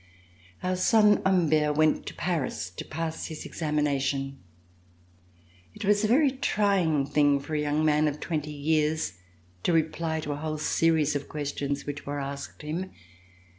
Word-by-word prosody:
Our 185 0 0
son 210 +2 +5
Humbert 155 -5 +3
went 155 0 +2
to - - -6
Paris 155 - -2
to 90 - -7
pass 160 0 -4
his 155 -1 -7
ex - - -9
amination. 140 -3 0 1.4
It - - -6
was 205 +1 +3
a - - +3
very 275 +5 +4
trying 195 - +1
thing 145 0 +3
for 145 +3 -8
a 150 - +1
young 150 +1 +1
man 155 0 +3
of 150 0 -2
twenty 150 -2 -3
years 150 - 0 0.4
to - - +1
reply 160 0 0
to 150 - -4
a 145 - -3
whole 155 0 -3
series 155 -1 +2
of 140 0 -3
questions 145 -1 -3
which 145 -1 -6
were 145 0 -2
asked 140 +1 -6
him. 170 +5 -3
155 Hz, 160 wpm, -27 LUFS, 145-165 Hz, 1.4 s, son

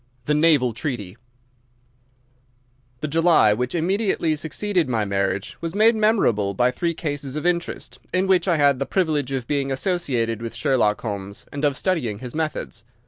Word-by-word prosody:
The 150 - +1
Naval 150 -6 +3
Treaty 110 - -4 1.9
The 155 - -1
July 160 -8 +4
which 125 +7 -2
immediately 175 -2 +1
succeeded 165 +1 -1
my 110 -4 0
marriage 100 -1 -2
was 165 +2 -4
made 220 +2 +5
memorable 120 - +2
by 125 +4 +3
three 170 +6 -2
cases 145 -4 -4
of 150 - -4
interest, 175 0 -2
in 185 +1 +1
which 190 0 +2
I 170 -3 +3
had 140 -3 +3
the 140 - -2
privilege 150 -7 0
of 130 -3 -2
being 140 +1 -1
associated 130 - -1
with 115 -1 -6
Sherlock 125 -8 +1
Holmes 100 -2 -5
and 145 +1 -5
of 145 -3 +2
studying 145 - -1
his 125 +2 -8
methods. 155 - -3
145 Hz, 160 wpm, -23 LUFS, 115-170 Hz, 1.9 s, made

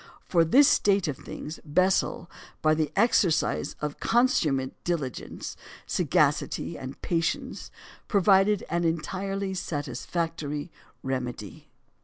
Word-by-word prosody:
For 170 -2 +3
this 265 - +6
state 200 -3 +3
of 145 - -2
things, 155 +4 -8
Bessel, 185 +2 +1 0.4
by 155 0 +5
the 155 -2 0
exercise 165 - +2
of 150 -1 -4
consummate 155 - +2
diligence, 150 -9 -4 0.3
sagacity, - - +1
and 130 +1 -8
patience, 165 -1 -2 0.4
provided 200 0 +4
an 170 0 +1
entirely 190 +4 -2
satisfactory 160 -1 -3 0.3
remedy. 125 -6 -4
165 Hz, 100 wpm, -27 LUFS, 145-195 Hz, 0.4 s, this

